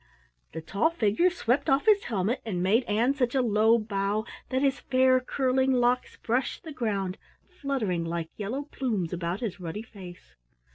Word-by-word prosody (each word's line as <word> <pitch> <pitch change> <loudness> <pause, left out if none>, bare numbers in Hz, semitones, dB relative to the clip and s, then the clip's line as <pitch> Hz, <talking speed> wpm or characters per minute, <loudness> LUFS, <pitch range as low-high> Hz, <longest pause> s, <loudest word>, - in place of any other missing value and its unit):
The 160 - -5
tall 200 - +1
figure 330 - +2
swept 280 -6 0
off 270 +1 +3
his 420 -2 +4
helmet 220 +3 -1
and 180 -6 -2
made 220 +7 +3
Ann 230 +5 +2
such 255 -3 -1
a 265 - +4
low 220 0 +4
bow 205 0 -1 0.2
that 260 +1 0
his 275 -1 +1
fair 255 0 +3
curling 260 0 +1
locks 245 0 +1
brushed 245 +3 -2
the 315 - -8
ground, 200 -7 -2 0.3
fluttering 270 - -2
like 165 -1 -4
yellow 225 +7 -3
plumes 220 - -3
about 175 +2 -3
his 210 -6 -4
ruddy 180 +5 -5
face. 185 -5 -12
230 Hz, 170 wpm, -27 LUFS, 195-265 Hz, 0.3 s, his